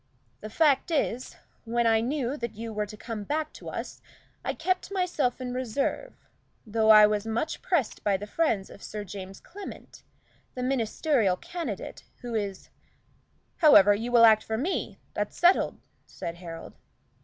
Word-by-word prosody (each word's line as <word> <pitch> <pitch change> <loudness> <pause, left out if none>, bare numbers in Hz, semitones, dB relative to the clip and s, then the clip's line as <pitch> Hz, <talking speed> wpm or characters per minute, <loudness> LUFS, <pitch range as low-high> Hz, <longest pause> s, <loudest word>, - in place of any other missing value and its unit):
The 215 - -8
fact 290 +4 +3
is, 260 -6 -1 0.3
when 235 +1 0
I 225 -1 +4
knew 260 +1 -1
that 235 -5 -5
you 225 +1 -6
were 210 0 -2
to 215 +1 -10
come 225 -2 -6
back 310 +6 -2
to - - -9
us, - - -6 0.4
I - - -2
kept 370 +1 -1
myself 355 -10 0
in 250 -1 -4
reserve, 260 - -2 0.5
though 220 0 +1
I 215 -1 +10
was 210 +1 0
much 235 +8 -2
pressed 325 - -1
by 200 -2 +2
the 205 - -7
friends 210 -5 0
of 200 - -13
Sir 210 -1 -6
James 195 0 -8
Clement, 400 +3 -11 0.5
the 250 - -3
Ministerial 245 - +1
candidate, 345 -1 -6 0.2
who 240 -1 -6
is 200 -3 -3 0.4
" - - -40
"However, 205 - +8
you 225 +4 -3
will 235 -1 +7
act 220 -1 +6
for 220 - -3
me 320 +11 -2 0.2
that's - - -3
settled?" 350 +2 +3 0.3
said 170 - -6
Harold. 165 -2 -9
230 Hz, 165 wpm, -27 LUFS, 210-295 Hz, 0.5 s, I